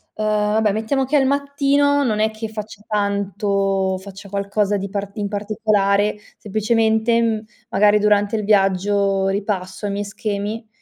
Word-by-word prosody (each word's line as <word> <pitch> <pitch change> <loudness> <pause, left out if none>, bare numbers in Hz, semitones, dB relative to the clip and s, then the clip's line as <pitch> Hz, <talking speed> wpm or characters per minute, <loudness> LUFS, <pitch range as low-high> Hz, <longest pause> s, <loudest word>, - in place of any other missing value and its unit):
ehm, 215 - -2 0.3
vabbè 220 -1 +2
mettiamo 225 +6 0
che 280 +4 -1
è - - +6
al 265 - +2
mattino, 280 +1 +2
non 215 -5 0
è 220 +1 +2
che 220 +1 -6
faccia 215 -1 -8
tanto 200 -2 0
faccia 195 +1 -11
qualcosa 200 +1 0
di 195 0 -4
part 200 0 -5
in 205 -1 -1
particolare. 205 0 +1 0.2
Semplicemente, 220 +2 +1
mhmm, 220 -2 0 0.3
magari 210 +1 +4
durante 205 0 +2
il 215 - -1
viaggio 195 -1 +2
ripasso 195 -1 -3
i 205 - -1
miei 205 +1 -3
schemi 210 +2 -4
210 Hz, 155 wpm, -20 LUFS, 200-220 Hz, 0.3 s, è